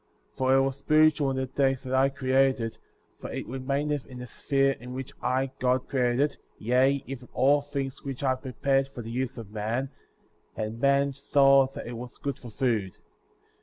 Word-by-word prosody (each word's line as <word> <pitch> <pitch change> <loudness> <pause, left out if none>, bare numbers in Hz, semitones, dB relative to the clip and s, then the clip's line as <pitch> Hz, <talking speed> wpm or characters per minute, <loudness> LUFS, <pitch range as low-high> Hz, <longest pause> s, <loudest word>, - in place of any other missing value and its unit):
* - - -40
For 130 0 +3
it 135 - +5
was 135 0 -1
spiritual 155 0 +3
in 135 - -2
the 130 - 0
day 135 +1 +1
that 130 0 -7
I 135 +1 +4
created 135 -1 +2
it; 115 -1 -4 0.4
for - - -7
it - - -4
remaineth 140 +3 -2
in 130 - -10
the 125 - -6
sphere 135 +2 +1
in 125 +1 -8
which 130 0 -6
I, 130 +1 0
God, 125 0 +1
created 125 -2 +1
it, 145 +1 +1 0.2
yea, 130 +4 +2
even 130 -2 -8
all 145 +3 +4
things 140 -1 -4
which 135 -1 -5
I 130 -1 +3
prepared 135 +1 0
for 130 -3 -9
the 115 - -7
use 130 +2 -3
of 110 -3 -9
man; 115 +6 -2 0.6
and 110 +1 -4
man 140 +1 +3
saw 135 -1 +4
that - - -6
it 120 0 -6
was 120 +1 -9
good 140 -1 -4
for 120 - -10
food. 110 -5 -1
130 Hz, 200 wpm, -27 LUFS, 125-140 Hz, 0.6 s, it